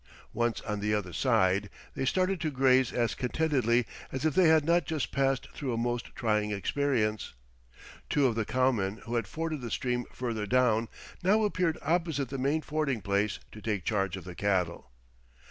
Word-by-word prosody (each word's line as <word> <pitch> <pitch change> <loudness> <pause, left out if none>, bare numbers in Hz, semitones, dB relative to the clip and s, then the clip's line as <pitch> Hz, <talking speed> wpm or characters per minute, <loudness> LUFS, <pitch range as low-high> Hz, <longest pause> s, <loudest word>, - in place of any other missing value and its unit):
Once 120 -1 0
on 105 0 -3
the 105 +1 +1
other 90 -4 -3
side 95 +5 +2 0.2
they 135 - -2
started 185 +4 +1
to 155 - 0
graze 130 -2 +3
as 120 -2 0
contentedly 125 -3 +1 0.3
as 130 +3 -3
if 155 - +2
they 185 +1 +5
had 160 -2 +5
not 170 +1 +3
just 155 0 -3
passed 135 -1 +1
through 135 -4 -3
a 115 - -1
most 120 +1 -1
trying 105 -2 +1
experience. 110 - -1 0.7
Two 145 -2 +3
of 125 - +3
the 115 0 0
cowmen 115 -5 +1
who 115 - -5
had 115 -4 0
forded 155 +4 -3
the 120 - -5
stream 125 +1 -1
further 115 -4 -3
down, 115 -2 +2 0.3
now 210 +4 +3
appeared 180 -6 +1
opposite 160 -4 0
the 135 - -4
main 140 +4 +1
fording 150 -5 -1
place, 100 0 0
to 105 - -11
take 105 -5 -2
charge 100 -3 0
of 95 - -8
the 90 +1 -8
cattle. 90 -7 -1
125 Hz, 180 wpm, -29 LUFS, 105-145 Hz, 0.7 s, they